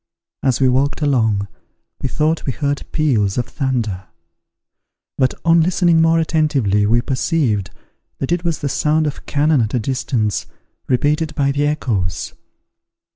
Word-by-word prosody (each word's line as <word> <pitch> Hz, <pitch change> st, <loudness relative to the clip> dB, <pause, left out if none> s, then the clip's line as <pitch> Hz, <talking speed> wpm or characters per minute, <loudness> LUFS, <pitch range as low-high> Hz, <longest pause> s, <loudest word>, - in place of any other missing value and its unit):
As 130 Hz, -2 st, +1 dB
we 135 Hz, -, +4 dB
walked 140 Hz, +4 st, +1 dB
along, 110 Hz, -8 st, +1 dB, 0.5 s
we 130 Hz, -, -2 dB
thought 155 Hz, +3 st, 0 dB
we 130 Hz, -, 0 dB
heard 140 Hz, +4 st, -2 dB
peals 115 Hz, -11 st, +1 dB
of 120 Hz, -, 0 dB
thunder; 115 Hz, -, -2 dB, 1.1 s
but, 130 Hz, -1 st, +1 dB
on 165 Hz, 0 st, +5 dB
listening 170 Hz, -1 st, +3 dB
more 165 Hz, 0 st, +4 dB
attentively, 140 Hz, -, +1 dB
we 120 Hz, +2 st, +3 dB
perceived 130 Hz, -, 0 dB, 0.5 s
that 135 Hz, -, -4 dB
it 175 Hz, 0 st, 0 dB
was 170 Hz, -3 st, -2 dB
the 145 Hz, -, -1 dB
sound 155 Hz, +3 st, +1 dB
of 150 Hz, -, -5 dB
cannon 150 Hz, -1 st, +2 dB
at 110 Hz, +2 st, -1 dB
a -, -, +2 dB
distance, 115 Hz, -3 st, -1 dB, 0.4 s
repeated 150 Hz, +5 st, 0 dB
by 140 Hz, -1 st, +1 dB
the 145 Hz, +1 st, 0 dB
echoes. 110 Hz, -, -2 dB
140 Hz, 145 wpm, -19 LUFS, 115-155 Hz, 1.1 s, on